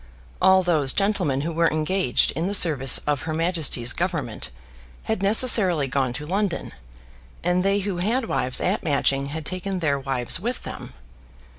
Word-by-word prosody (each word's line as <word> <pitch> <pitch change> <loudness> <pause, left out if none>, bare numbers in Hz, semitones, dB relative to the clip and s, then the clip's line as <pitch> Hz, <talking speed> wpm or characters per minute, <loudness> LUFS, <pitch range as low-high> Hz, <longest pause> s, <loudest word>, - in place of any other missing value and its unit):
All 190 0 +5
those 155 -6 +1
gentlemen 185 -9 0
who 165 +3 -3
were 165 +1 +2
engaged 155 -2 +1
in 165 +3 -3
the 200 - +1
service 145 -8 +4
of 145 -2 -1
Her 155 -1 -4
Majesty's 160 -8 +1
Government 150 - -3 0.5
had 220 -3 -2
necessarily 200 - +3
gone 130 -1 -1
to 150 +4 -6
London, 190 +1 -2 0.7
and 180 +1 +1
they 200 +1 +1
who 195 -2 -3
had 225 +8 0
wives 130 - -1
at 195 +4 -1
Matching 140 -2 0
had 155 +2 -6
taken 185 +2 -3
their 145 -5 0
wives 135 -3 0
with 240 +6 -4
them. - - -8
170 Hz, 160 wpm, -23 LUFS, 140-190 Hz, 0.7 s, All